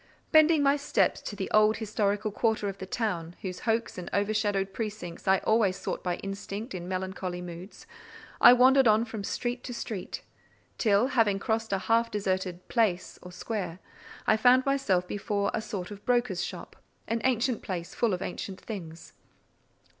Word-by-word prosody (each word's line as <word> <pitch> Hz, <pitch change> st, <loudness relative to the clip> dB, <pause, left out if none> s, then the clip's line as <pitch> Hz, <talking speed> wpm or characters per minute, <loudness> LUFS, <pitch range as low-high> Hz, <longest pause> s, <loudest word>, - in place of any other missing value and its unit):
Bending 310 Hz, -1 st, +6 dB
my 280 Hz, +1 st, +4 dB
steps 285 Hz, +1 st, +1 dB
to 205 Hz, -, -6 dB
the 190 Hz, -1 st, -3 dB
old 215 Hz, 0 st, +4 dB
historical 210 Hz, -1 st, -1 dB
quarter 220 Hz, -1 st, 0 dB
of 195 Hz, -1 st, -5 dB
the 190 Hz, -, -6 dB
town, 175 Hz, -6 st, -2 dB
whose 180 Hz, -2 st, -4 dB
hoar 230 Hz, 0 st, +1 dB
and 180 Hz, -, -6 dB
overshadowed 205 Hz, -1 st, 0 dB
precincts 210 Hz, -7 st, -6 dB
I 190 Hz, 0 st, +5 dB
always 220 Hz, -4 st, +3 dB
sought -, -, -4 dB
by 180 Hz, -1 st, 0 dB
instinct 200 Hz, +5 st, -6 dB
in 175 Hz, -1 st, -6 dB
melancholy 185 Hz, -1 st, -3 dB
moods, 180 Hz, +2 st, -9 dB, 0.6 s
I -, -, +10 dB
wandered 260 Hz, +1 st, +6 dB
on 215 Hz, +1 st, +4 dB
from 225 Hz, -3 st, -6 dB
street 245 Hz, +4 st, -3 dB
to 245 Hz, -, -5 dB
street, 215 Hz, -5 st, -5 dB, 0.6 s
till, 215 Hz, +3 st, +3 dB
having 225 Hz, -7 st, +3 dB
crossed 220 Hz, +2 st, -1 dB
a 195 Hz, -, +2 dB
half 230 Hz, +4 st, +2 dB
deserted 185 Hz, -3 st, -2 dB
"place" 210 Hz, -7 st, 0 dB
or 180 Hz, -, -10 dB
square, 185 Hz, -3 st, -4 dB, 0.5 s
I 215 Hz, -, +4 dB
found 250 Hz, +3 st, +5 dB
myself 245 Hz, -11 st, +1 dB
before 200 Hz, 0 st, -1 dB
a -, -, -1 dB
sort 200 Hz, -3 st, -5 dB
of 205 Hz, 0 st, -9 dB
broker's 240 Hz, -7 st, +1 dB
shop; -, -, -7 dB, 0.3 s
an 230 Hz, 0 st, -1 dB
ancient 250 Hz, -1 st, +1 dB
place, 175 Hz, -3 st, -5 dB
full 225 Hz, -5 st, +1 dB
of 180 Hz, -, -5 dB
ancient 190 Hz, +1 st, -5 dB
things. 170 Hz, -7 st, -8 dB
205 Hz, 170 wpm, -28 LUFS, 185-230 Hz, 0.6 s, I